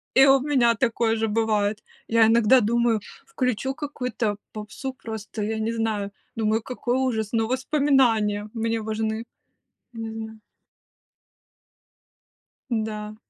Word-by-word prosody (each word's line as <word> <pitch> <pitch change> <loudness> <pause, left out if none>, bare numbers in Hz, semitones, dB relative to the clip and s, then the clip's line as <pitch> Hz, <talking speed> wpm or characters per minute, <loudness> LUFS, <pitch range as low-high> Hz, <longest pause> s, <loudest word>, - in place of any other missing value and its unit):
И 265 - +8
у 270 0 +6
меня 255 -4 +3
такое 230 -1 +1
же 225 0 0
бывает. 215 -1 0 0.2
Я 225 -1 +5
иногда 235 +2 +5
думаю: 235 0 +2 0.3
включу 265 - -1
какую-то 250 -8 -3 0.2
попсу, 215 +5 -6
просто 220 -3 -7
я 220 +1 -2
не 225 +1 -1
знаю. 215 -3 -1 0.2
Думаю: 220 0 +1
какой 250 0 -2
ужас! 225 -5 0
Но 225 -1 +2
воспоминания 250 -6 +2
мне 225 -1 -1
важны. 220 +1 -2 0.7
Мгм. 220 -1 -7 2.3
Да. 215 -2 -3
225 Hz, 115 wpm, -24 LUFS, 215-250 Hz, 2.3 s, И